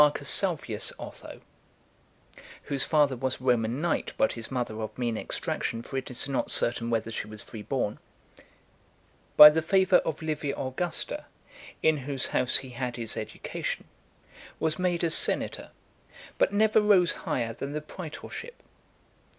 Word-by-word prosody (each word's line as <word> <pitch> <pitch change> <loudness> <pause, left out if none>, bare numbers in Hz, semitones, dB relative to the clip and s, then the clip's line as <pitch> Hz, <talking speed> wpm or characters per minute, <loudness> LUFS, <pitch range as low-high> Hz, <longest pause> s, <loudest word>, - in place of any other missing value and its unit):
Salvius 145 - +3
Otho - - -10 1.2
(whose 140 -3 +1
father 145 -4 +2
was 130 +1 -2
a - - -14
Roman 120 0 +1
knight, 170 -1 -1
but 110 - +3
his 115 -1 -5
mother 120 -4 -3
of 110 - -6
mean 120 -2 -1
extraction, 115 +1 -3
for 135 - -9
it 130 -1 -3
is 125 +2 -1
not 135 -2 -1
certain 115 0 +1
whether 115 -1 -1
she 110 - -4
was 105 -1 -8
free 110 - -9
born), 115 -2 -2 1.4
by 150 0 +12
the 160 +1 0
favour 190 +3 +4
of 155 +1 -3
Livia 150 -3 -2
Augusta, 140 +7 -3 0.6
in 160 -1 +4
whose 135 -1 -3
house 125 - +3
he 130 - -8
had 125 -1 -4
his 115 -3 -4
education, 110 - -5 0.7
was 160 +2 0
made 180 -1 0
a 165 - +1
senator, - - 0 0.7
but - - +3
never 215 +1 +4
rose 195 -5 +4
higher 115 -2 -3
than 140 +5 -6
the 150 - -2
praetorship. 180 - -9
135 Hz, 150 wpm, -27 LUFS, 120-160 Hz, 1.4 s, by